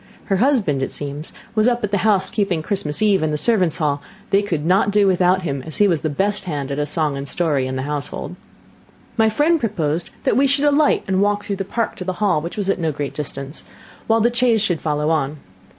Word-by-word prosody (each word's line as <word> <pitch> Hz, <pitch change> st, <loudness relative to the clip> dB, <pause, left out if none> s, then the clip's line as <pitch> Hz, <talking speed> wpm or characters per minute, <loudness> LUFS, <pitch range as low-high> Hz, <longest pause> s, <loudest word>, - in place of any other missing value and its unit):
Her 195 Hz, -, +1 dB
husband, 210 Hz, -, +2 dB
it 135 Hz, -, -2 dB
seems, 145 Hz, +2 st, -4 dB, 0.2 s
was 215 Hz, +1 st, +3 dB
up 240 Hz, -2 st, +1 dB
at 205 Hz, -, -1 dB
the 205 Hz, -, +1 dB
house 200 Hz, -3 st, +2 dB
keeping 195 Hz, -7 st, -1 dB
Christmas 160 Hz, -2 st, -1 dB
eve 205 Hz, -3 st, +3 dB
in 155 Hz, -, 0 dB
the 150 Hz, -, -1 dB
servants' 185 Hz, -4 st, +2 dB
hall; 145 Hz, -4 st, 0 dB, 0.3 s
they 200 Hz, 0 st, +4 dB
could 165 Hz, -7 st, -3 dB
not 190 Hz, +3 st, +3 dB
do 205 Hz, 0 st, +3 dB
without 185 Hz, 0 st, +3 dB
him, 140 Hz, -5 st, -2 dB
as 155 Hz, +3 st, -8 dB
he 205 Hz, -, +5 dB
was 170 Hz, -5 st, +1 dB
the 155 Hz, -, -1 dB
best 200 Hz, +8 st, -1 dB
hand 145 Hz, -5 st, -4 dB
at 140 Hz, -, -2 dB
a 150 Hz, -, -1 dB
song 150 Hz, -2 st, 0 dB
and 140 Hz, 0 st, -5 dB
story 145 Hz, -7 st, 0 dB
in 130 Hz, -, -4 dB
the 130 Hz, -, -2 dB
household. 145 Hz, +4 st, -4 dB, 0.8 s
My 220 Hz, -2 st, +3 dB
friend 305 Hz, +9 st, +2 dB
proposed 170 Hz, -, -1 dB
that -, -, +2 dB
we 275 Hz, +3 st, +4 dB
should 280 Hz, +2 st, +1 dB
alight 290 Hz, +1 st, +3 dB
and 190 Hz, 0 st, +1 dB
walk 205 Hz, 0 st, +1 dB
through 200 Hz, -2 st, -3 dB
the 195 Hz, -, -3 dB
park 230 Hz, +4 st, -2 dB
to -, -, -5 dB
the 185 Hz, 0 st, -2 dB
hall, 190 Hz, -5 st, +1 dB
which 170 Hz, +5 st, -6 dB
was 205 Hz, -2 st, -2 dB
at 195 Hz, -, +1 dB
no 160 Hz, -2 st, 0 dB
great 145 Hz, -1 st, -4 dB
distance, 140 Hz, 0 st, -5 dB, 0.4 s
while 225 Hz, 0 st, +3 dB
the 235 Hz, +2 st, +2 dB
chaise 235 Hz, -3 st, +3 dB
should 175 Hz, -6 st, 0 dB
follow 150 Hz, 0 st, 0 dB
on. 150 Hz, -2 st, 0 dB
185 Hz, 240 wpm, -20 LUFS, 150-210 Hz, 0.8 s, he